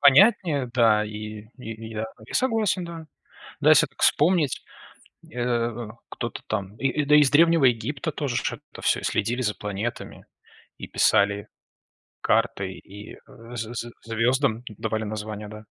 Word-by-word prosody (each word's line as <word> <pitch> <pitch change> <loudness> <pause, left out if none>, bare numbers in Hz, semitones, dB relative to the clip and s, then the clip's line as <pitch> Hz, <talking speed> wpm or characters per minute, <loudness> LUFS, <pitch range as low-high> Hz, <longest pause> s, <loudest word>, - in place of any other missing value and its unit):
Понятнее, 145 - +5
да, 115 -4 +4
и 105 0 -7
и 115 -2 -7
я 110 0 -3 0.2
я - - -10
согласен, 220 -7 +1
да. 165 -2 -8 0.6
Да, - - +5
если - - +7
так - - -16
вспомнить, 155 -3 +3 0.7
э, 120 -1 -1 0.2
кто-то 120 - -5
там, 100 -1 -3
и 135 +4 0
да, 150 +1 +5
из 145 -3 +6
древнего 165 0 +5
Египта 130 +6 +1
тоже 140 -5 -2
ж - - -1 0.2
это - - -10
всё, - - +2
и - - -15
следили 125 +2 0
за 105 -3 0
планетами 105 +3 -5 0.5
и - - -6
писали 100 0 +2 0.7
карты, 95 -1 +1
и, 105 +2 -11
э, 120 -3 -14
з 115 0 -4
з 120 0 -5
звёздам 115 +1 +1
давали 110 -1 -2
названия, 105 0 -5
да? 105 0 -10
120 Hz, 150 wpm, -25 LUFS, 110-140 Hz, 0.7 s, если